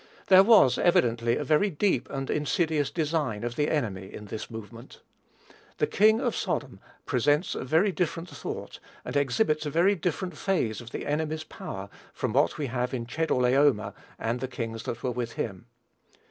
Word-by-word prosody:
There 190 -1 +9
was, 195 - +6
evidently, 120 -8 +2
a - - -2
very 155 +8 +3
deep 180 - 0
and 135 -1 -4
insidious 150 0 0
design 150 -9 -1
of 120 0 -3
the 150 +2 +1
enemy 100 -10 -2
in 105 - -9
this 105 +1 -6
movement. 115 +2 -10 0.8
"The - - +2
king 220 +2 +4
of - - -1
Sodom" - - -3 0.3
presents 145 +4 +1
a - - -4
very 160 +10 +3
different 170 -1 -2
thought, - - -7 0.3
and - - -5
exhibits 150 - +1
a - - -1
very 170 +7 +3
different 180 -1 -3
phase 135 - -1
of 120 - -10
the - - -5
enemy's 155 +1 -2
power, 95 -9 -7 0.3
from 125 -4 -2
what 140 +3 +2
we 150 - -2
have 125 0 -2
in 120 -2 -4
"Chedorlaomer 130 -3 +2 0.2
and 115 +2 -2
the 130 - -3
kings 115 -3 -5
that 120 - -5
were 130 - 0
with 120 -1 -4
him." 100 0 -5
140 Hz, 175 wpm, -27 LUFS, 120-160 Hz, 0.8 s, There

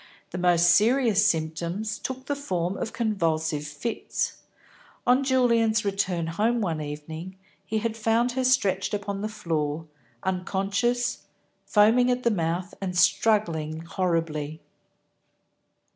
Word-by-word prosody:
The 180 - -4
most 175 -1 +4
serious 220 +1 +4
symptoms 170 +5 -2
took 260 0 -5
the 285 - -1
form 185 -10 -2
of 225 - -4
convulsive 165 -9 -1
fits. 150 +10 -3 0.7
On 250 +2 +4
Julian's 235 -5 +2
return 190 -4 0
home 215 +9 0
one 165 -7 -1
evening, 160 +5 -7 0.3
he 220 - -1
had 225 0 -1
found 225 +2 +1
her 260 +1 -1
stretched 205 -7 +2
upon 200 -1 -4
the 215 - -2
floor, 165 -7 -2 0.4
unconscious, 195 +6 -1 0.4
foaming 230 +4 +4
at 250 0 0
the 235 - +3
mouth, 175 0 -2
and 180 -2 -3
struggling 165 -5 +2
horribly. 165 -3 -2
195 Hz, 120 wpm, -26 LUFS, 165-225 Hz, 0.7 s, most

